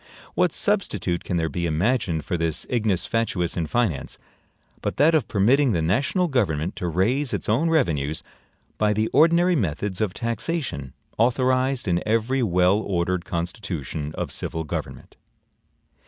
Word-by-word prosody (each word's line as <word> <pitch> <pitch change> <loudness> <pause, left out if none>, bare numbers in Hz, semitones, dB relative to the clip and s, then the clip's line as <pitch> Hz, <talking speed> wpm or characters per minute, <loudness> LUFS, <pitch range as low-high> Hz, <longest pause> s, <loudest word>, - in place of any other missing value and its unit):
What - - +2
substitute 85 -1 0
can 90 - -2
there 80 -1 0
be 85 +3 -2
imagined 85 - 0
for - - -1
this 80 -2 -1
ignis 110 -7 +1
fatuus 105 -7 -1
in 85 -3 -1
finance, 105 - -1 0.6
but - - -3
that 160 +3 +5
of 155 -7 +2
permitting 120 +6 +3
the 85 - +1
national 135 - +1
government 95 - 0
to 90 - -2
raise 120 - 0
its - - -4
own 130 +10 +2
revenues 80 - 0 0.6
by 105 -1 +3
the 110 +1 0
ordinary 170 +3 +4
methods 95 - -2
of 105 -4 -1
taxation 115 - -3 0.3
authorized 130 +1 +2
in 85 -1 +1
every 115 +4 +1
well 90 -1 +3
ordered 90 -3 -1
constitution 85 - -4
of - - -3
civil 80 - -3
government? 75 - -6
105 Hz, 145 wpm, -24 LUFS, 85-125 Hz, 0.6 s, that